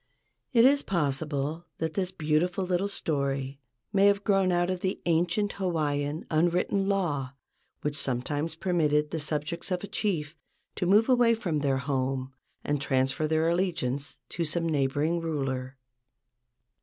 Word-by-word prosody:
It 235 -3 +6
is 280 +2 +5
possible 150 0 -2
that 160 -1 -2
this 185 -2 -1
beautiful 175 +2 0
little 180 +2 0
story 140 -6 -1 0.3
may 200 0 +5
have 200 0 +3
grown 195 -3 +3
out 175 +1 +2
of 185 - -2
the 190 +1 -2
ancient 175 +5 +1
Hawaiian 150 -4 -1
unwritten 175 +4 +2
law 145 -9 -1 0.5
which 150 0 -2
sometimes 145 +4 -1
permitted 150 -4 +1
the 165 - -2
subjects 150 +4 -2
of 180 0 -2
a - - -4
chief 170 -7 -2 0.4
to 180 - 0
move 210 +4 +5
away 240 -3 +4
from 175 -9 -1
their 140 -2 +1
home 130 0 -2 0.3
and 145 -1 -1
transfer 135 +2 +1
their 160 +1 +2
allegiance 165 -7 -1
to 170 - -2
some 165 +1 -1
neighboring 150 +3 +1
ruler. 135 -5 -3
160 Hz, 145 wpm, -28 LUFS, 145-185 Hz, 0.5 s, It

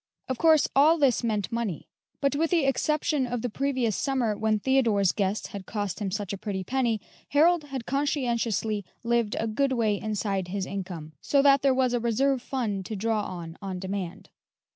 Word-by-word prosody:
Of 260 - -3
course, 320 -2 +5
all 305 +5 +6
this 270 -6 +2
meant 210 -4 -1
money; 230 -8 -3 0.3
but 280 0 +2
with 325 +2 +1
the 335 -5 +2
exception 295 0 +1
of 245 -2 -3
the 245 - -2
previous 260 -4 0
summer, 255 -5 0
when 215 0 +1
Theodore's 220 -6 +2
guests 200 +1 -1
had 200 -3 -8
cost 205 -3 -3
him 205 -2 -2
such 200 0 -3
a 195 - -5
pretty 195 -3 -3
penny, 235 0 0 0.3
Harold 320 +2 +4
had 270 -5 -6
conscientiously 235 -7 0 0.2
lived 235 -2 +1
a 225 - 0
good 265 +5 0
way 220 -4 +1
inside 200 -3 -2
his 190 +1 -3
income, 180 -6 -6
so 280 -1 +3
that 275 -1 +6
there 275 - +4
was 255 -1 +2
a 245 - +2
reserve 250 +3 +1
fund 225 -7 -2
to 220 - -4
draw 220 +1 0
on, 170 -4 -7
on 190 -2 -4
demand. 190 -1 -5
230 Hz, 185 wpm, -27 LUFS, 200-270 Hz, 0.3 s, all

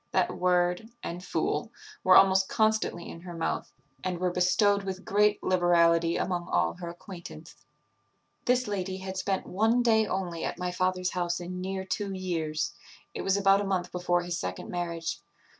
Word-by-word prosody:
That 185 -1 +1
word, 180 +3 +1
and 175 +1 -5
fool, - - -1 0.3
were 185 - +6
almost 190 0 +5
constantly 220 -5 +1
in 165 - -9
her 175 -1 -8
mouth, 165 - -2 0.3
and 180 -1 -2
were 180 0 0
bestowed 200 +3 +3
with 190 -1 -5
great 210 +1 +2
liberality 170 -2 +3
among 175 -2 -2
all 85 -1 +2
her 170 - -6
acquaintance. 170 -2 -10 0.9
"This 250 0 +2
lady 190 -2 -2
had 190 0 -6
spent 190 +1 -1
one 225 +6 +2
day 220 -2 +4
only 180 -4 -3
at - - -3
my 180 0 -2
father's 185 0 0
house 175 -1 -1
in 180 +1 -6
near 190 0 -3
two 200 +1 -2
years; 160 -5 -2 0.4
it - - -4
was 195 +1 +2
about 195 0 +4
a - - -1
month 185 -2 -1
before 175 0 0
his 175 0 -3
second 90 0 -5
marriage. 170 -2 -3
180 Hz, 170 wpm, -28 LUFS, 175-195 Hz, 0.9 s, were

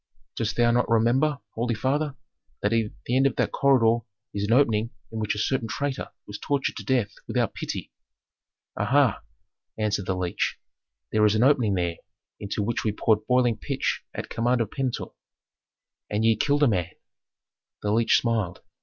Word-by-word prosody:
"Dost 110 -2 -2
thou 120 0 +4
not 120 +1 +2
remember, 125 +6 +3 0.2
holy 115 +1 -1
father, 140 +5 0 0.5
that 105 +2 +2
at 115 -2 +1
the 120 - 0
end 135 +1 +5
of 135 - -2
that - - 0
corridor 120 -4 +3 0.3
is 100 - -2
an 105 - -1
opening 115 -4 +3 0.2
in 110 - -4
which 105 -1 -1
a - - -5
certain 115 +3 0
traitor 140 +3 -3 0.2
was 105 - -8
tortured 140 -2 -1
to - - -6
death 120 -6 +1
without - - 0
pity." - - -5 0.8
"Aha!" - - +2 0.6
answered 105 -3 -1
the 95 - 0
leech. 90 -1 -1 0.5
"There 105 - +3
is 105 0 +4
an 110 - +3
opening 125 -7 +4
there 85 -2 -1 0.4
into 100 +1 -2
which 115 +3 -1
we 110 - +1
poured 105 +1 +1
boiling 125 -2 +3
pitch - - -2
at - - -4
command 120 +2 +1
of 110 -3 -1
Pentuer." 130 -3 -3 1.0
"And 105 +2 0
ye 115 0 +5
killed 145 +6 +2
a - - +6
man 90 -7 0 0.5
" - - -66
The 105 - 0
leech 115 +2 +4
smiled. 110 -7 -1
115 Hz, 175 wpm, -26 LUFS, 105-125 Hz, 1.0 s, a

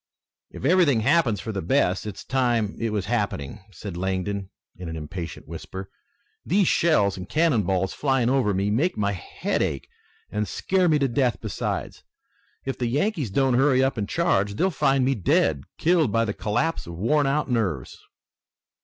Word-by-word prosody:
"If - - -8
everything 155 -7 +4
happens 130 - +3
for 110 - -5
the 100 -2 -3
best 90 +4 +1
it's 105 - -7
time 120 -5 +1
it 115 - -1
was 105 -3 -1
happening," 100 - -2
said 95 0 -8
Langdon 95 +2 -2 0.3
in 90 -2 -7
an 80 - -5
impatient 80 +1 -7
whisper. 95 0 -8 0.5
"These 195 -2 +2
shells 105 - +3
and 90 0 -8
cannon 155 -8 +3
balls 95 0 0
flying 135 -4 +1
over 130 -4 +2
me 100 +1 0
make 150 +12 +1
my 100 -1 +1
head 90 -3 -3
ache 70 - -2 0.4
and 105 0 -1
scare 185 - +1
me 155 - +4
to 140 -2 +2
death 125 0 +1
besides. 110 -3 -4 0.6
If 135 - -3
the 120 - 0
Yankees 150 - 0
don't 130 +5 +2
hurry 130 +1 +4
up 135 - +1
and 105 -3 -3
charge, 105 - +1
they'll 190 - +1
find 135 -4 +2
me 135 - +2
dead, 80 - +1
killed 160 -7 +3
by 115 +1 +2
the 105 - -2
collapse 120 - -1
of 85 - -7
worn 140 - +2
out 140 -1 0
nerves." 95 - -1
115 Hz, 175 wpm, -24 LUFS, 95-140 Hz, 0.6 s, everything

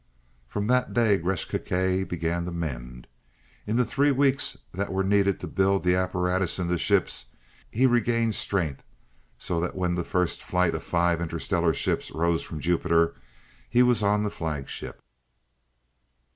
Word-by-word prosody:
From 105 +10 -3
that 125 +2 +1
day 110 -4 +3
Gresth 90 +1 -2
Gkae 95 +1 0
began 85 0 -2
to 90 - -4
mend. 60 -7 -5 0.6
In 105 - -1
the 125 +1 +3
three 140 +5 +2
weeks 140 0 +2 0.2
that 100 +3 -3
were 95 0 0
needed 100 0 +2
to - - -6
build 95 0 +1
the 90 0 +3
apparatus 90 0 0
into 90 -1 -1
ships, - - +2 0.4
he 125 +4 +2
regained 120 -2 +2
strength 95 -10 0 0.6
so 85 - -2
that 90 - -3
when 90 -2 0
the 85 0 -1
first 90 0 -1
flight 90 0 +1
of - - -3
five 85 0 +1
interstellar 85 0 0
ships - - -1
rose 85 0 0
from 80 - -7
Jupiter, 85 0 +2 0.6
he 125 +1 +4
was 125 -2 +3
on 105 +1 +2
the 105 - -2
flagship. 75 -4 -6
90 Hz, 155 wpm, -26 LUFS, 85-105 Hz, 0.6 s, he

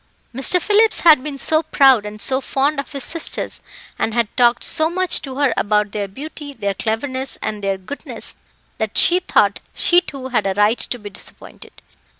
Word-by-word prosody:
Mr. 270 +8 +4
Phillips 425 +3 +3
had 315 -6 +6
been 290 -1 -5
so 310 +3 +2
proud 270 -8 +3
and 210 +1 -9
so 260 +5 0
fond 280 +2 -1
of 280 - -6
his 275 -3 -3
sisters, 330 -1 -3 0.4
and 225 - -1
had 235 -3 -1
talked 240 -1 +3
so 315 0 +2
much 370 +1 +1
to 265 -2 -8
her 280 -3 +1
about 210 0 0
their 205 -1 -3
beauty, 285 +6 -9
their 200 -6 -3
cleverness, 260 +6 -3
and 210 -1 -5
their 195 -1 -1
goodness, 190 +10 -7 0.4
that 220 -1 -3
she 355 +2 +5
thought 370 - +1 0.2
she 350 0 +4
too 275 -6 -8
had 245 -5 0
a 190 - -2
right 210 +3 +2
to 245 - -5
be 205 -3 -10
disappointed. - - -12
265 Hz, 185 wpm, -19 LUFS, 215-300 Hz, 0.4 s, had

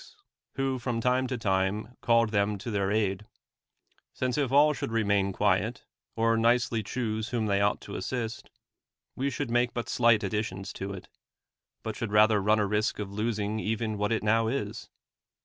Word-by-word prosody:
s - - -16 0.4
who 135 -1 -1
from 120 -1 -2
time 125 +2 +1
to 130 -1 -3
time 105 +2 -1
called 115 -1 +3
them 100 -1 +1
to 115 +4 -6
liiMir 100 -2 0
aid; 105 -1 0 0.9
since 125 -1 -1
if 140 -4 0
all 150 +2 +5
should 125 - -4
remain 100 -3 +1
quiet, 105 +4 0 0.3
or 115 0 +2
nicely 115 0 +2
choose 110 0 -3
whom 115 -3 -1
they 100 -1 +1
ought 100 0 +2
to - - -9
assist; 120 -3 -4 0.7
we 135 +2 -1
should 125 -3 -4
make 120 0 +1
but 120 - -3
slight 115 -3 +3
additions 100 -1 -3
to 95 +1 -5
it. 95 -2 -8 0.8
but 110 -1 -4
should 115 0 -3
i 105 - +8
ather 110 -2 +3
run 105 +2 +3
a 105 - +2
risk 105 +2 0
of 100 -2 -5
losing 105 0 -2
even 110 0 -2
what 105 +1 -1
it 115 - 0
now 110 +1 +3
is. 135 +5 -3
110 Hz, 185 wpm, -28 LUFS, 105-120 Hz, 0.9 s, i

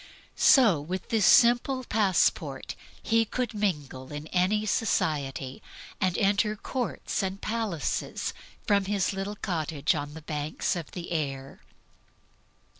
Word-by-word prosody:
So 220 - +5
with 180 +6 -5
this 215 -5 +3
simple 245 +2 +5
passport 185 - +1 0.3
he 225 0 +3
could 245 +2 -3
mingle 150 -11 -2
with 150 +1 -7
any 195 +4 +2
society, 145 - -1 0.4
and 185 -2 +1
enter 205 +1 +2
courts 245 0 -3
and 190 0 -3
palaces 215 - -2 0.3
from 200 -1 +2
his 200 -1 0
little 195 +2 -4
cottage 160 -5 -1
on 145 -1 -5
the 160 - -9
banks 150 +2 -2
of 170 -4 -5
the 175 -1 -7
Ayr. 135 -4 -4
185 Hz, 120 wpm, -28 LUFS, 150-210 Hz, 0.4 s, So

